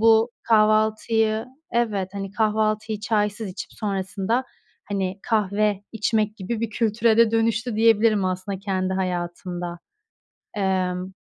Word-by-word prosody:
bu 225 +1 +5
kahvaltıyı 220 +1 +2 0.3
Evet, 210 -6 0
hani, 195 -1 -5
kahvaltıyı 215 0 0
çaysız 210 -1 0
içip 185 - -8
sonrasında, 200 +4 -1 0.4
hani, 195 -1 -2
kahve 210 -2 +1
içmek 215 0 0
gibi 215 +4 -4
bir 230 -1 -2
kültüre 225 +1 +2
de 230 -1 +5
dönüştü 225 0 0
diyebilirim 220 -2 +4
aslında 185 +1 -2
kendi 190 -1 -1
hayatımda. 175 -1 -3 0.8
Emm 185 -2 -1
210 Hz, 110 wpm, -24 LUFS, 190-225 Hz, 0.8 s, bu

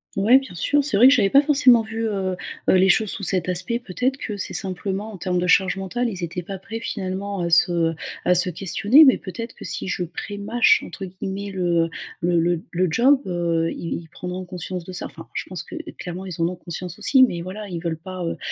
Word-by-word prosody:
Ouais, 215 +6 +6
bien 265 -9 -5
sûr, 290 +11 +2
c'est 280 -6 -1
vrai 240 +6 +8
que - - +6
j'avais 210 -7 +3
pas 275 - +6
forcément 270 -5 +5
vu, 225 +1 -4
heu 190 -3 -2 0.3
heu, - - +6
les 190 0 +5
choses 205 +3 +3
sous 200 - -5
cet 185 -1 0
aspect. 210 +7 0
Peut-être 250 +5 -2
que 210 -6 -5
c'est 195 - -4
simplement 195 +2 -3
en 205 - -9
termes 180 0 -1
de 180 - -1
charge 190 +1 +4
mentale, 195 +6 -2
ils 190 -5 -6
étaient 170 +1 -4
pas 195 +3 -7
prêts, 225 +4 -7
finalement, 200 -2 -4
à 170 - -1
se, 170 +1 +4 0.2
heu, - - -8 0.3
à 180 - +4
se 180 +1 +3
questionner, 200 - +4
mais 265 -4 +6
peut-être 230 +5 -7
que - - -10
si - - -4
je 180 - -1
«prémâche» 205 +7 +1
entre 195 - -8
guillemets 190 +2 -6
le 175 -3 +1 0.3
le 175 0 +2
le 175 +1 +2
d 160 - -11
le 180 +1 +1
job, 260 - +4
heu, 170 -2 0
ils 170 - -5
ils - - -16
prendront 180 +2 -6
conscience 180 -1 -6
de 185 - -8
ça. 180 - -4
Enfin, - - -12
je - - -3
pense - - -5
que, - - -10
heu, - - -7
clairement 180 +2 -6
ils 175 -3 -6
en 165 - +3
ont 180 - -4
conscience 175 0 -7
aussi, 265 - +3
mais 175 -9 +1
voilà, 195 +4 -7
ils 175 -3 -5
veulent 165 -2 -2
pas, 185 +1 -7
heu 165 - -3
190 Hz, 245 wpm, -22 LUFS, 175-220 Hz, 0.3 s, vrai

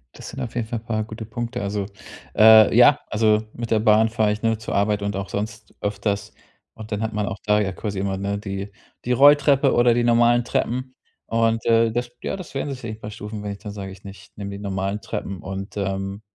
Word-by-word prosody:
Das - - -9
sind 135 - -7
auf 120 -3 -5
jeden 120 -2 -2
Fall 115 0 -3
paar 110 -1 -2
gute 110 +1 -8
Punkte. 120 +2 -4
Also, 100 0 -2 0.5
äh, 110 -1 +8
ja, - - +7
also, 110 0 +2
mit 120 -1 -6
der 110 - +4
Bahn 110 0 +4
fahre 110 -2 +1
ich 105 - -7
nur 115 -1 +1
zur 115 - -4
Arbeit 100 +1 +1
und 100 0 -2
auch 100 0 -4
sonst 105 0 -5
öfters. 100 0 -2 0.4
Und 110 0 -11
dann 105 0 -2
hat 110 0 -2
man 105 -1 -1
auch - - -4
da 105 0 +3
ja 95 -2 -1
quasi 100 +1 -4
immer, 95 0 -1
ne, 100 +1 -2
die 100 0 -5 0.3
die 125 - -1
Rolltreppe 140 0 +5
oder 120 0 +4
die 120 +1 +1
normalen 120 0 +4
Treppen. 130 +2 -2 0.3
Und, 115 0 +1
äh, 115 -1 +4
das 120 +1 -3
ja, - - -3
das 185 -4 -9
werden 140 +1 -3
sicherlich 115 -4 -7
bei 105 - -7
Stufen, 105 0 -7
wenn 105 0 -4
ich 100 - -12
dann 105 - -7
sage 100 -2 -7
ich 95 0 -14
nicht: 100 -1 -12
„Nimm 100 -1 -5
die 100 - -7
normalen 100 0 -2
Treppen“. 100 -3 -5
Und, 95 +2 -6
ähm, 95 0 -3
110 Hz, 230 wpm, -23 LUFS, 100-115 Hz, 0.5 s, äh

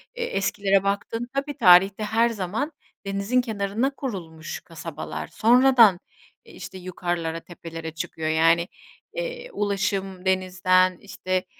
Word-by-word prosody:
eee, 480 - -3
eskilere 195 - +1
baktığında 205 +4 -2
tabii, 280 +1 -3
tarihte 195 -2 +6
her 225 +2 +2
zaman 225 - -3 0.3
denizin 200 +6 0
kenarına 220 +3 -2
kurulmuş 170 - -6
kasabalar. 165 -2 -7
Sonradan, 235 -5 +5 0.5
e, - - -15
işte, 190 - -9
yukarılara 175 -2 -3
tepelere 165 -1 -8
çıkıyor. 160 -1 -4
Yani, 165 +2 +3 0.5
eee, - - -5
ulaşım 195 -2 -2
denizden, 185 -1 +2
işte, 185 -1 -3
195 Hz, 115 wpm, -24 LUFS, 180-230 Hz, 0.5 s, tarihte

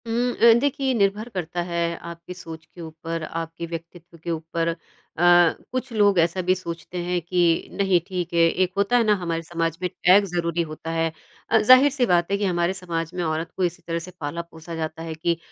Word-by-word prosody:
उम, 240 +2 0
अ, 235 0 +6
देखिए 275 0 -1
ये 260 - +2
निर्भर 210 +1 +1
करता 175 -4 -3
है 170 0 -1 0.3
आपकी 170 +2 -10
सोच 165 -3 -10
के 175 - -14
ऊपर 165 0 -6
आपके 165 +1 -5
व्यक्तित्व 170 0 -9
के 170 - -2
ऊपर। 165 +1 -2 0.5
अ, 170 - 0 0.5
कुछ 255 0 -3
लोग 205 -4 +4
ऐसा 170 +3 +2
भी 185 +1 +2
सोचते 170 0 -7
हैं 175 0 0
कि 175 +2 0 0.3
नहीं 195 -3 +2
ठीक 180 -3 -4
है 170 - +2
एक 185 +1 0
होता 200 +5 +3
है 240 - +4
ना 215 -1 +4
हमारे 165 -1 -2
समाज 165 -1 -2
में 180 - 0
टैग 190 +4 +4
ज़रूरी 170 -2 -1
होता 160 +1 -6
है। 165 0 0 0.4
अ, - - +5
ज़ाहिर-सी 255 +2 +6
बात 175 -3 +2
है 200 - +2
कि 205 - -1
हमारे 175 -1 +1
समाज 170 -3 -4
में 180 -1 -2
औरत 160 0 -2
को 190 - 0
इसी 175 0 -1
तरह 165 0 -1
से 180 +2 -9
पाला-पोसा 165 +2 -6
जाता 160 0 -4
है 165 -1 -5
कि 170 +1 0
175 Hz, 210 wpm, -24 LUFS, 165-190 Hz, 0.5 s, अ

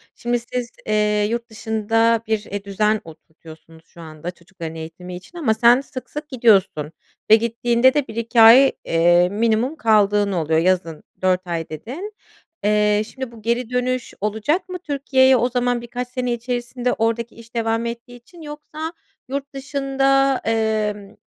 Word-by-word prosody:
Şimdi 240 0 -1
siz, 240 +1 -5 0.2
eee, 210 -1 +1
yurt 235 0 -3
dışında 225 +1 +1
bir, 220 -1 0
eee, 200 0 -5
düzen 210 +2 0
oturtuyorsunuz 160 0 -15
şu 170 - -15
anda 160 +2 -7
çocukların 170 -2 -9
eğitimi 165 +3 -8
için 265 - -12
ama 260 -10 +1
sen 240 +3 +5
sık 255 -3 -9
sık 300 0 -7
gidiyorsun 195 - +2 0.4
ve 220 - +9
gittiğinde 235 +3 +2
de 295 -3 0
1-2 230 +1 +1
ay, 245 +5 +8
eee, 175 +2 +4
minimum 225 +6 0
kaldığın 210 -5 +3
oluyor, 160 -2 +1
yazın 170 -3 0 0.2
4 185 0 +1
ay, 165 -2 -3
dedin. 270 - -7 0.5
Eee, 210 0 +3
şimdi, 260 -1 -7
bu, 230 - -14
geri 235 +2 -1
dönüş 250 0 -2
olacak 220 - -1
mı 365 0 -5
Türkiye'ye 265 -4 +3
o 245 +2 +1
zaman 245 -1 0
birkaç 245 +1 -5
sene 250 -1 -2
içerisinde 245 +1 -2
oradaki 230 +1 -1
iş 230 +1 -16
devam 225 0 0
ettiği 235 +1 -7
için? 325 +9 -16
Yoksa 305 +2 -7 0.4
yurt 275 +1 -5
dışında, 275 -1 +1
emm, 215 -2 -1
230 Hz, 150 wpm, -21 LUFS, 205-255 Hz, 0.5 s, ve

